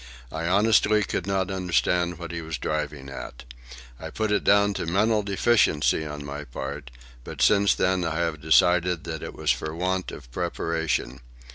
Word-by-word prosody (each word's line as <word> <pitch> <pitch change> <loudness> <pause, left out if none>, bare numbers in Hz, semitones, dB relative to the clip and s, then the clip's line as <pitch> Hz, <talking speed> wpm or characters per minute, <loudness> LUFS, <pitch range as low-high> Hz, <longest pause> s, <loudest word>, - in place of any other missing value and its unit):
I 80 +1 -3
honestly 105 +2 +3
could 95 - -3
not 95 -1 0
understand 90 -1 0
what 85 -1 -7
he 85 0 -4
was 80 -1 -5
driving 75 -2 -3
at. 65 -2 -8 0.6
I - - -7
put 110 -1 -2
it 105 - +1
down 100 0 +4
to 85 - -4
mental 105 +5 +2
deficiency 100 -7 +2
on 75 -1 -7
my 70 +1 -6
part, 70 +1 -7 0.3
but - - -9
since 100 -1 +4
then 95 -1 +1
I 80 -2 -2
have 85 -3 -2
decided 90 +2 +3
that 80 -2 -5
it - - -7
was - - +1
for 80 0 -3
want 90 +2 -1
of - - -11
preparation. 80 -5 -2
85 Hz, 170 wpm, -25 LUFS, 75-95 Hz, 0.6 s, down